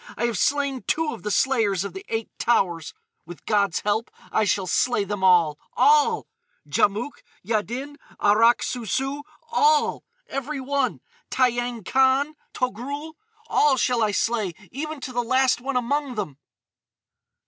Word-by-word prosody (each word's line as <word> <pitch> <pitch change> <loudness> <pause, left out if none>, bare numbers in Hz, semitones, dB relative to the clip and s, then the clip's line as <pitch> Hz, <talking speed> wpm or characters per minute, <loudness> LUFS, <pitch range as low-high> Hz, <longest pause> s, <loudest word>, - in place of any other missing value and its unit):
I - - 0
have 230 -6 -1
slain 280 0 0
two 315 -1 0
of 230 - -9
the 210 - -3
Slayers 210 -5 +2
of 200 -3 -6
the 190 - -8
Eight 225 -1 -3
Towers. 175 -9 +1 0.3
With 175 -3 -12
God's 200 -4 +1
help 210 +2 0 0.2
I 220 - +2
shall 200 -2 +1
slay 215 +5 +1
them 205 -1 -4
all—all!—Djamouk, 240 - +1 0.2
Yaddin, 240 +7 -2 0.2
Arrak 230 +4 +4
Sou 245 -2 -3
Sou—all!—every 310 - -1
one!—Tiyang 250 -3 -1
Khan, 265 +5 +3 0.2
Togrul,—all 290 - -1
shall 250 -1 +1
I 215 - +3
slay, 210 -2 0 0.2
even 305 +2 -5
to 255 -1 -6
the 245 - +1
last 260 +1 +2
one 265 0 -1
among 265 +2 -1
them!" 155 - -4
245 Hz, 125 wpm, -24 LUFS, 210-285 Hz, 0.3 s, Arrak